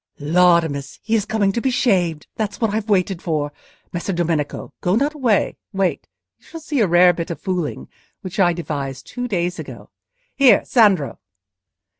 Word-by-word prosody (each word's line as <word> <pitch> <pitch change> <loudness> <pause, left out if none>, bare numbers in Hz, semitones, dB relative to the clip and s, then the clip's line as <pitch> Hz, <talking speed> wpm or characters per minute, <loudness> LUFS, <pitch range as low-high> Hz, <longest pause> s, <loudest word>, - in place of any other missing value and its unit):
Laudamus! 160 -3 +2
he 225 - -3
is 215 -3 +2
coming 215 -3 +1
to 235 - -2
be 265 - +1
shaved; 180 - +1
that's 210 -2 -3
what 225 -4 0
I've 220 0 -2
waited 190 -2 +1
for. 150 -3 -2 0.4
Messer 175 +3 -3
Domenico, 165 -4 -2
go 180 +2 +1
not 285 +6 +1
away: 245 -9 +1 0.2
wait; 190 -2 -1 0.3
you - - -27
shall 330 - -8
see 300 -3 -2
a 215 - +4
rare 175 +1 +6
bit 170 -1 -5
of 170 - -5
fooling, 180 -6 -3 0.3
which 185 +1 -7
I 175 -2 +5
devised 140 -5 -5
two 245 0 -5
days 180 -4 -2
ago. - - -9 0.4
Here, 275 -3 +5
Sandro!" 200 - +3
180 Hz, 170 wpm, -20 LUFS, 170-220 Hz, 0.4 s, rare